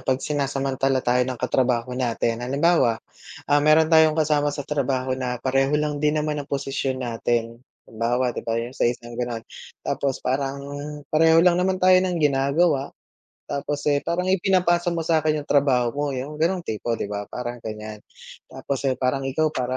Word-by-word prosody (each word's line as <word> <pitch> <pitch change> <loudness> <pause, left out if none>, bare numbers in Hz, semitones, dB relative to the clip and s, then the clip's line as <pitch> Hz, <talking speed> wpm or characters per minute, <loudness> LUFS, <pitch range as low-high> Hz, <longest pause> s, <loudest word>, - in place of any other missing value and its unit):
‘pag 130 0 0
sinasamantala 135 -2 -1
tayo 125 +1 +2
ng 130 - -3
katrabaho 125 -1 0
natin. 120 -2 -1
Halimbawa, 135 -2 +2 0.4
ah, 145 0 +3
meron 155 +2 +4
tayong 160 -1 +6
kasama 150 -2 +2
sa 145 -1 -4
trabaho 130 -3 -1
na 125 -1 -2
pareho 135 +2 +2
lang 150 -1 -1
din 150 +1 +2
naman 150 -1 -1
ang 140 - -9
posisyon 135 -2 -2
natin. 115 0 -2 0.2
Halimbawa 120 +3 -1
‘di - - -5
ba, 115 0 -2
yung 120 +2 -3
sa 130 - +1
isang 120 0 -5
gano'n, 120 -1 -4 0.4
tapos 135 -2 -2
parang 135 +1 -1 0.6
pareho 160 +1 +5
lang 180 0 +4
naman 190 +1 +1
tayo 185 0 +5
ng 185 -1 -1
ginagawa. 140 0 +2 0.6
Tapos, 145 +1 -3
eh, 145 0 +2
parang 175 +4 -2
ipinapasa 180 -2 +2
mo 170 -2 -1
sa'kin 155 -2 +2
yung - - -21
trabaho 130 -4 +3
mo 145 +1 -2
yung 145 +4 -6
ganong 175 +2 +1
tipo, 115 +2 -2
‘di - - -3
ba? 105 0 -4
Parang 120 -1 -6
ganyan, 110 -1 -7 0.5
tapos, 140 -2 -4
eh, 130 - 0
parang 130 +1 0
ikaw 155 +3 0
para 130 -1 -2
135 Hz, 175 wpm, -23 LUFS, 125-155 Hz, 0.6 s, tayong